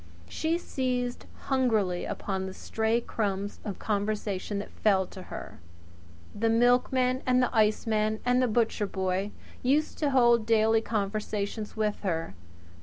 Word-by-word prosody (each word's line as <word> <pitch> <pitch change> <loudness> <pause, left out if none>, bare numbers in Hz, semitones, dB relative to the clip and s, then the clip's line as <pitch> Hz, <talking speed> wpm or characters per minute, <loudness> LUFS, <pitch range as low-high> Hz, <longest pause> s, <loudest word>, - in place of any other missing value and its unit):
She 320 - -1
seized 250 -6 -2
hungrily 220 -9 +1
upon 190 -1 -3
the 190 - -8
stray 225 +1 0
crumbs 200 -3 -2
of 200 -3 -5
conversation 205 -1 -2
that 200 - -5
fell 195 -3 +2
to 185 - -10
her. - - -9 0.7
The 225 +2 0
milkman 250 +2 +3
and 250 0 +4
the 250 -1 +1
iceman 215 0 +2
and 250 +1 +3
the 255 - +3
butcher 225 -2 +1
boy 190 +1 -1 0.3
used 290 +5 +1
to 295 - +2
hold 240 -4 +4
daily 225 0 +4
conversation 210 0 -2
with 215 -1 0
her. 165 - -2
220 Hz, 135 wpm, -28 LUFS, 200-245 Hz, 0.7 s, and